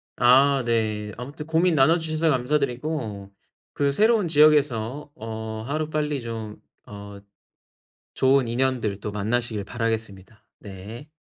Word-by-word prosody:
아 135 +2 +4
네. 110 -3 -1
아무튼 140 +5 -8
고민 165 +2 +2
나눠 155 +5 +5
주셔서 160 0 -1
감사드리고 125 -6 -2 0.4
그 140 -1 +1
새로운 215 +4 +3
지역에서 145 -4 +2
어 110 0 -6
하루빨리 150 -1 -2
좀 110 -2 -7 0.3
어 100 0 -10 0.9
좋은 130 -1 +3
인연들 120 -5 -1
또 105 - -5
만나시길 110 0 -1
바라겠습니다. 110 -3 -4
네. 105 +9 -10
125 Hz, 260 characters per minute, -24 LUFS, 110-150 Hz, 0.9 s, 나눠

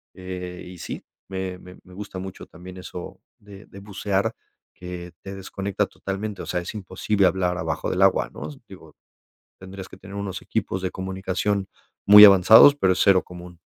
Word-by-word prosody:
eh, 90 -1 -7
y 90 0 -11
sí, - - -7 0.3
me 95 -1 -4
me 90 0 -13
me - - -20
me 90 - -17
gusta 100 -2 -7
mucho 95 0 -8
también 90 +1 -12
eso 90 -1 -9 0.2
de 100 0 -14
de 100 - -13
bucear, 100 -1 -2 0.4
que 90 -1 -8
te 95 0 -8
desconecta 95 0 -3
totalmente, 100 +1 -6
o - - -8
sea, 90 -1 -2
es 85 - -7
imposible 100 +1 -1
hablar 90 -1 0
abajo - - -3
del - - -1
agua, - - +3
¿no?, 75 - -7 0.2
digo, - - -14 0.6
tendrías 95 0 -10
que - - -13
tener 100 +1 -11
unos 100 -2 -5
equipos 95 - -3
de 95 - -2
comunicación 95 +1 -2 0.4
muy 105 0 +11
avanzados, 105 +8 +8
pero 95 -9 +2
es - - -5
0 95 -2 +4
común. 90 -1 -12
95 Hz, 180 wpm, -23 LUFS, 90-100 Hz, 0.6 s, muy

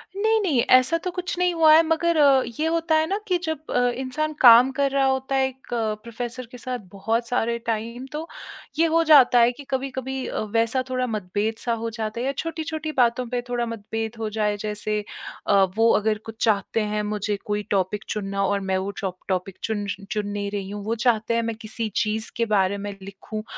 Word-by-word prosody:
नहीं, 440 +2 +2
नहीं, 320 -11 +1
ऐसा 255 +6 +5
तो 365 - -2
कुछ 360 0 -4
नहीं 360 -1 +2
हुआ 320 -2 +6
है 320 - +8
मगर 330 +1 +1 0.4
ये 310 - +1
होता 330 0 +1
है 315 0 +3
ना 390 - 0
कि 365 -2 +2
जब 315 -2 -4
अ, 245 0 +2
इंसान 310 +4 -2
काम 245 +1 +8
कर 275 +1 0
रहा 275 0 +2
होता 265 0 0
है 265 0 +3
एक 265 0 -12
प्रोफ़ेसर 235 +2 -3
के 250 - -9
साथ 250 +1 -4
बहुत 225 +4 -1
सारे 235 -1 0
टाइम 230 +2 -3
तो, 310 +2 -5 0.5
ये 330 - +5
हो 330 0 +3
जाता 275 -6 +7
है 235 +1 +5
कि 285 +4 -11
कभी-कभी 265 0 -3
अ, - - -3
वैसा 230 +4 0
थोड़ा 255 0 -1
मतभेद-सा 215 +2 -2
हो 230 - -1
जाता 220 0 -4
है 245 - -2
या 270 - +1
छोटी-छोटी 315 -1 -4
बातों 245 0 +3
पे 245 0 -1
थोड़ा 240 -1 0
मतभेद 225 0 -5
हो 220 -1 -2
जाए 210 -1 -1
जैसे 210 0 -2 0.5
अ, 195 -1 +5
वो 225 +1 +5
अगर 215 0 0
कुछ 225 0 -6
चाहते 215 0 +1
हैं 210 - 0
मुझे 210 0 -2
कोई 210 -1 -1
टॉपिक 195 +1 0
चुनना 195 -1 -2
और 200 +1 +1
मैं 190 -1 -1
वो 190 +2 -3
चॉ 190 -2 -2 0.2
टॉपिक 185 0 -2
चुन, 210 -2 -2 0.3
चुन 210 -1 -1
नहीं 205 0 -3
रही 200 -2 -4
हूँ। 205 0 -6
वो 225 +2 0
चाहते 230 -1 +1
हैं 230 - +2
मैं 230 0 -2
किसी 220 0 -4
चीज़ 215 +1 0
के 230 - +1
बारे 200 -2 +1
में 205 0 -5
लिखूँ 200 +2 -7
230 Hz, 210 wpm, -24 LUFS, 210-265 Hz, 0.5 s, है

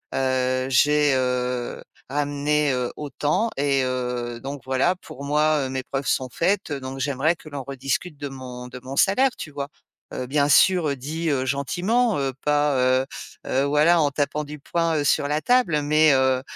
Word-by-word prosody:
heu, 130 -1 0
j'ai, 145 +2 +4
heu, 125 -1 -1 0.3
ramené, 145 +1 0
heu, 125 -1 -2
autant, 150 - -1
et 140 -1 +2
heu, 125 -2 -3
donc 140 0 -6
voilà, 130 +7 +1
pour 140 -6 -11
moi, 150 +1 +2
heu, - - -7
mes 130 0 -3
preuves 135 +1 -4
sont 130 - +1
faites 180 +3 0
donc 135 -1 -6
j'aimerais 140 +4 0
que - - -15
l'on 140 -2 -6
rediscute 140 +4 -3
de 145 - -5
mon 125 -2 -8
de 125 0 -10
mon 135 +2 -7
salaire», 255 +7 +4
tu 150 - -7
vois? 140 0 -5 0.4
Heu, 125 - -4
bien 145 +2 +1
sûr, 175 0 +5
heu, 140 - -1
dit, 155 +5 -3
heu, 135 -3 0
gentiment, 185 - 0
heu, 135 -1 -1
pas, 150 -1 +2 0.3
heu - - -8 0.4
heu, 135 - +1
voilà, 150 +4 +4
en 145 - +3
tapant 145 +2 -1
du 150 +1 -8
poing, 165 +3 -1
heu, 145 - 0
sur 145 0 +2
la 150 +1 0
table, 185 -12 +2
mais, 155 0 +4
heu 130 -1 +2
140 Hz, 185 wpm, -23 LUFS, 130-150 Hz, 0.4 s, sûr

